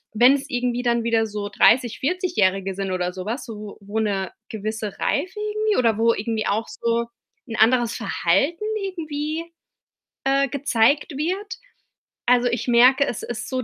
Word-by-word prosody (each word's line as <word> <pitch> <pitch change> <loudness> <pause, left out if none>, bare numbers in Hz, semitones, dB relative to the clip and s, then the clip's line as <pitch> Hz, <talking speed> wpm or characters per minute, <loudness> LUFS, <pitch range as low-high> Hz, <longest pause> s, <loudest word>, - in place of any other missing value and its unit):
Wenn's 265 +5 +5
irgendwie 245 -2 -1
dann 235 -1 +1
wieder 230 -1 +2
so 205 -1 -5
dreißig 235 +2 +3
Vierzigährige 200 - 0
sind 195 -1 -3
oder 180 -1 -1
so 185 -1 -7
was, 235 +6 -4
wo 210 -2 -8
wo 205 +3 -3
'ne 195 -3 -1 0.2
gewisse 215 -1 -4
Reife 370 +9 -1
irgendwie 425 0 0
oder 230 -4 +3
wo 230 +1 +3
irgendwie 220 +1 -2
auch 220 +3 0
so 235 0 -1 0.4
'n 230 - -5
anderes 235 +1 +3
Verhalten 335 +8 0 0.2
irgendwie, 315 -3 -4 0.8
äh, 275 +1 +2
gezeigt 275 +2 +1
wird. 390 +8 -2 0.7
Also, 245 0 +4
ich 240 +1 -2
merke, 250 +4 +5
es 235 - -4
ist 240 - -5
so 255 -1 -2
240 Hz, 155 wpm, -23 LUFS, 215-280 Hz, 0.8 s, Wenn's